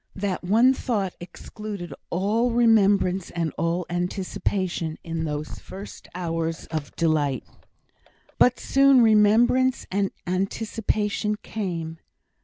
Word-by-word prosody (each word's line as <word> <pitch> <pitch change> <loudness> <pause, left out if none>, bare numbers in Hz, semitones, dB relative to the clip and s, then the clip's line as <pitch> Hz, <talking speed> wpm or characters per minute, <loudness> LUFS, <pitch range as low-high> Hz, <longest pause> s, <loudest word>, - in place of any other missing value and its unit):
That 195 -2 -2
one 230 +8 +5
thought 205 -8 -2
excluded 190 -1 -8 0.2
all 210 +7 +1
remembrance 205 -6 +3
and 165 -4 -2
all 170 +2 -1
anticipation, 180 -2 -2
in 165 -1 -3
those 150 0 -4
first 195 +2 -10
hours 165 -2 -3
of 155 -3 -4
delight. 150 -6 +1 1.0
But 250 0 +4
soon 275 -2 +5
remembrance 230 +4 +4
and 195 0 +1 0.2
anticipation 210 +2 -1
came. 165 -6 -4
190 Hz, 100 wpm, -24 LUFS, 170-215 Hz, 1.0 s, one